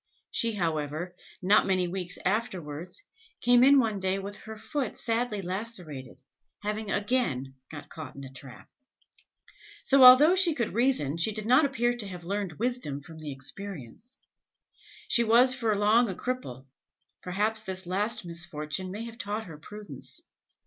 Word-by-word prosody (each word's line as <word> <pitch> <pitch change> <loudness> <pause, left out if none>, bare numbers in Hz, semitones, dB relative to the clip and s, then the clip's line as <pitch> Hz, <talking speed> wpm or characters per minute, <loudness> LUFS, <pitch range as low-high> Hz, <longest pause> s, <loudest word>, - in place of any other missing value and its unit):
She, 230 -1 +2
however, 165 -1 -2 0.3
not 200 +3 +5
many 185 -2 +2
weeks 180 0 -3
afterwards, 185 - -2 0.4
came 245 0 +5
in 280 +2 +7
one 220 -5 0
day 190 0 +1
with 200 +1 -6
her 220 +1 -9
foot 275 +1 -3
sadly 225 -3 -1
lacerated, 180 - -5 0.4
having 210 0 -3
again 200 - 0 0.2
got 150 -2 -9
caught 155 -2 -9
in 140 - -9
a 135 - -9
trap. 125 -1 -11 1.2
So 275 -1 +5
although 260 +7 +9
she 370 -4 +4
could 235 -5 -2
reason, 230 - +1
she 170 +6 +2
did 215 0 -3
not 255 +6 +5
appear 240 -3 +1
to 235 -4 -4
have 180 -2 -8
learned 195 -1 -3
wisdom 230 - -2
from 160 +3 -12
experience. 155 - -5 0.9
She 235 0 +5
was 240 +3 +6
for 230 -5 0
long 215 +3 +4
a 190 - -4
cripple; 210 - -4 0.6
perhaps 210 +4 0
this 190 -3 -5
last 205 +3 -1
misfortune 170 +1 -2
may 205 +4 -5
have 230 0 -10
taught 210 +1 -3
her 160 -4 -10
prudence. 210 +5 -7
205 Hz, 150 wpm, -28 LUFS, 170-235 Hz, 1.2 s, although